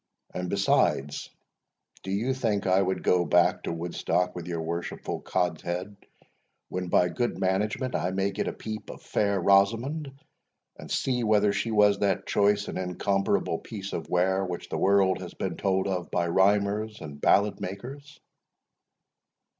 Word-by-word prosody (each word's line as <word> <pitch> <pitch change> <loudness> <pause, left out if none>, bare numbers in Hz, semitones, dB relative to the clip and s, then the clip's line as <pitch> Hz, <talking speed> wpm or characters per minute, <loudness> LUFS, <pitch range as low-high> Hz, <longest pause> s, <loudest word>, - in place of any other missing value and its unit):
and, 90 0 -3
besides, 70 -3 +1 0.7
do 95 - -8
you 110 +7 0
think 110 -6 -1
I 95 0 +4
would 95 0 -1
go 90 -1 +3
back 85 +2 +3
to - - -4
Woodstock 85 +2 -1
with 90 -1 -6
your 85 -2 -3
worshipful 85 +1 -4
cods 90 -4 -1
head, 90 +4 -4 0.7
when, 90 0 -3
by 90 0 +3
good 120 +7 -2
management, 105 +7 0
I 90 - 0
may 95 +1 0
get - - -3
a - - 0
peep 110 -1 -7
of - - -10
fair 100 -2 0
Rosamond, 115 - +2 0.6
and - - -11
see 125 -2 0
whether 105 -2 +3
she 115 - -1
was 105 -2 +4
that 95 -1 0
choice 100 0 +2
and - - -4
incomparable 95 -1 0
piece 100 -3 -7
of - - -4
ware, 95 +2 +2
which 90 -2 -5
the - - -2
world 95 -1 +3
has 90 - -8
been 90 -3 -3
told 95 0 0
of 90 -3 -2
by 85 -1 0
rhymers 100 +4 +2
and 75 -2 -9
ballad 100 0 +3
makers?" 135 +10 -7
95 Hz, 160 wpm, -27 LUFS, 90-105 Hz, 0.7 s, I